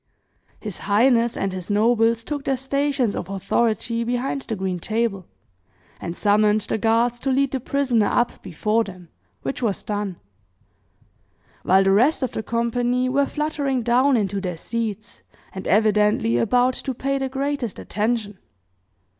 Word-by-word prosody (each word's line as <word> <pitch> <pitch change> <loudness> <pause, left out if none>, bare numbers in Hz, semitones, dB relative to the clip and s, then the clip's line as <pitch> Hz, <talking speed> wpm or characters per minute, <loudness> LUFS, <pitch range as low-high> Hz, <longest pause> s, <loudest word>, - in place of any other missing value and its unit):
His 210 -4 -6
highness 235 +2 +3
and 195 -1 -1
his 185 -2 -6
nobles 225 +2 +2
took 290 +2 -4
their 270 -1 +1
stations 270 -3 0
of - - -5
authority 225 +4 0
behind 245 +3 -2
the 225 - -4
green 190 -2 -3
table, 215 -2 -2 0.7
and 170 0 -6
summoned 210 +1 +3
the 220 - -2
guards 230 +2 +2
to 270 - -2
lead 270 0 +2
the 265 - -1
prisoner 250 -5 +1
up 240 - 0
before 210 +5 0
them, 185 -4 -11 0.3
which 265 - -4
was 215 -5 -1
done; 205 -3 -3 1.5
while 190 +1 +4
the 195 - +3
rest 250 +10 +3
of 255 - -1
the - - -3
company 240 +3 0
were 275 +2 +2
fluttering 285 -4 -1
down 255 +3 +3
into 200 -2 -1
their 180 -3 -4
seats, 220 +1 -4 0.3
and 190 - -6
evidently 210 - +3
about 250 - +3
to 265 0 -4
pay 275 +3 -1
the 265 -1 -2
greatest 275 -4 -2
attention. 215 -2 -2
230 Hz, 150 wpm, -23 LUFS, 205-255 Hz, 1.5 s, while